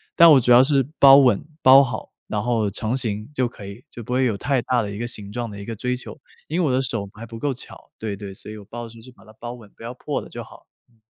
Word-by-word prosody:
但 170 -1 +8
我 135 - +7
主 125 0 +1
要 125 +2 +8
是 135 -2 +2
包 135 -1 +9
稳、 125 -7 +4 0.2
包 135 +2 +8
好， 125 - -5 0.2
然 105 -1 -2
后 115 -4 0
成 110 +4 -2
型 105 -4 -3
就 130 -3 0
可 105 -4 -11
以， 100 +5 -10
就 120 - -10
不 125 - -5
会 130 +1 +2
有 110 -5 0
太 135 +1 0
大 120 -1 0
的 100 - -5
一 100 - -7
个 120 - -3
形 105 -4 -8
状 120 0 -4
的 100 -1 -9
一 100 - -8
个 115 - -5
追 125 +4 -2
求。 125 - -10 0.3
因 165 +4 -1
为 160 - +2
我 - - +1
的 130 - +2
手 115 -6 -3
还 115 - -9
不 115 0 -10
够 145 +1 -1
巧， 125 - -11
对 105 -2 -4
对， 100 -1 -8
所 105 - -10
以 110 - -8
我 100 - -12
包 120 +3 -8
的 115 - -8
时 115 - -15
候 - - -14
就 130 - -14
把 110 - -21
它 110 - -16
包 120 +2 -8
稳， 115 -4 -13
不 - - -19
要 120 +2 -7
破 - - -4
了 - - -12
就 - - -7
好。 - - -17 0.2
嗯。 115 -2 -32
120 Hz, 335 characters per minute, -22 LUFS, 105-130 Hz, 0.3 s, 包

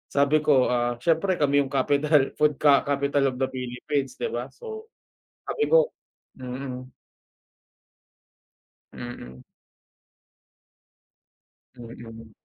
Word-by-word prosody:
Sabi 145 +2 +3
ko, 145 -4 +4
ah, 120 -1 0
siyempre 170 +6 +1
kami 145 -1 +3
yung 135 - -3
capital 140 +1 +2
food 150 -2 +3
ka 145 -2 +5
capital 140 0 0
of 130 - -7
the 130 - +1
Philippines, 130 - -3
di - - -3
ba? - - -4
So, 445 -1 -10 0.6
sabi 445 - -1
ko - - +4 0.5
mm. 130 0 -6 2.0
Mm. 65 - -9 2.3
Mm. 115 -2 -11
140 Hz, 100 wpm, -25 LUFS, 125-150 Hz, 2.3 s, ka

